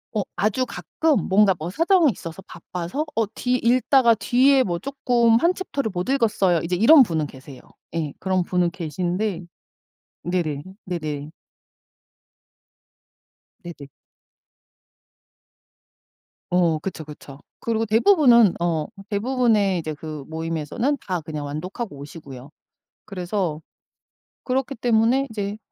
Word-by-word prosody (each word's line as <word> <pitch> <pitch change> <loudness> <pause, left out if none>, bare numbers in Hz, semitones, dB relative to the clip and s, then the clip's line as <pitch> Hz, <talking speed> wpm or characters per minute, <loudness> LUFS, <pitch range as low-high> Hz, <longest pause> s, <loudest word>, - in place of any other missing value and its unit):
어 210 - +2
아주 215 +6 0
가끔 240 - -1
뭔가 195 -1 +4
뭐 160 +3 -5
사정이 330 - +3
있어서 170 0 -9
바빠서 180 - -5
'어 225 - +2
뒤 250 0 -1
읽다가 250 0 +4
뒤에 260 +5 +3
뭐 175 -6 -2
쪼끔 240 -2 +2
1 345 +7 +2
챕터를 280 -10 -3
못 180 +4 -3
읽었어요' 210 -10 +2
이제 175 +2 -1
이런 255 - +7
분은 165 - +1
계세요. 135 -1 -12 0.3
예 155 -4 -2
그런 185 -1 0
분은 180 -1 +1
계시는데 180 +3 -3 0.8
네네 165 -5 -2 0.2
네네. 155 -4 -5 2.3
네네. 160 -5 -9 2.6
어 170 -3 +2
그쵸 175 -2 -6
그쵸. 145 -2 -12 0.2
그리고 225 -1 -1
대부분은 235 - +5
어 165 -3 0 0.2
대부분의 215 -3 +1
그 - - -1
이제 155 -1 -4
그 150 -1 -8
모임에서는 165 - -2
다 180 -3 -1
그냥 150 -1 -6
완독하고 165 - -6
오시고요. 140 -2 -11 0.5
그래서 180 -4 -3 0.8
그렇기 265 +1 -1
때문에 235 +3 +2
이제 205 -1 -4
190 Hz, 250 characters per minute, -23 LUFS, 160-240 Hz, 2.6 s, 이런